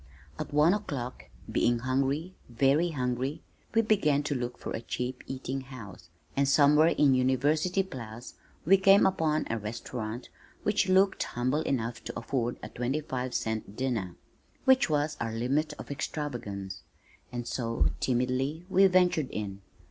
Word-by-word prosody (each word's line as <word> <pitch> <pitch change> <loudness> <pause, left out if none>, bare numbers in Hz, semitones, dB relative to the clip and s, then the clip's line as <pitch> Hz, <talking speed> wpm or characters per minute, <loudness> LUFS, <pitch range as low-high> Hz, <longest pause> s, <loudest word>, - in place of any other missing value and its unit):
At - - -4
one 150 +4 +5
o'clock, 140 -12 -4 0.3
being 120 0 +2
hungry, 135 +8 -1 0.2
very 135 +8 +3
hungry, 130 +1 -2 0.3
we 225 - +5
began 150 -10 +2
to 145 - -1
look 125 -2 -3
for - - -6
a - - -3
cheap 125 +2 -4
eating 135 0 -4
house, 105 -10 -11 0.3
and 140 0 +2
somewhere 150 +2 +6
in 145 -4 +4
University 145 +9 +2
Place 120 - -8 0.3
we 195 +5 +6
came 195 +1 +6
upon 160 -5 +1
a 115 - -2
restaurant 110 +2 -5 0.3
which 210 -2 +1
looked 190 +1 +4
humble 130 +5 0
enough 115 -5 -2
to - - -5
afford 120 0 -2
a - - -6
twenty 130 +5 -2
five 130 -4 -4
cent 110 -2 -2
dinner 115 -9 -2 0.5
(which 265 -4 +5
was 150 0 0
our 115 -1 -2
limit 140 +7 0
of 150 - -9
extravagance), 100 - -4 0.5
and 120 -1 -4
so, 115 -2 0
timidly, 130 +6 0
we 195 +1 +6
ventured 180 -6 +3
in. 100 -2 -5
135 Hz, 150 wpm, -29 LUFS, 120-155 Hz, 0.5 s, somewhere